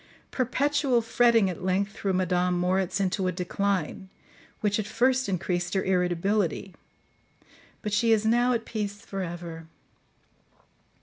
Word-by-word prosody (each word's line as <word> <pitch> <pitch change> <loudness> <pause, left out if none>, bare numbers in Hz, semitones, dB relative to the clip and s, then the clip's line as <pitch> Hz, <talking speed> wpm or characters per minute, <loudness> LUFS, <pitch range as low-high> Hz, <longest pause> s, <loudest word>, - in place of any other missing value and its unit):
Perpetual 265 -1 +1
fretting 230 -2 +4
at 180 -1 -5
length 190 +2 0
threw 200 -1 -2
Madame 180 -1 +1
Moritz 185 +2 0
into 190 0 0
a - - +1
decline, 190 0 -2 0.5
which 205 0 +1
at 210 - -3
first 255 +2 +1
increased 175 -1 -1
her 190 - +1
irritability, 185 +1 0 1.1
but 210 -2 -3
she 230 +2 +3
is 220 -1 +3
now 240 +3 +3
at 230 -2 -1
peace 205 -2 -4
for 195 -2 -4
ever. 170 -2 -6
195 Hz, 130 wpm, -27 LUFS, 180-225 Hz, 1.1 s, fretting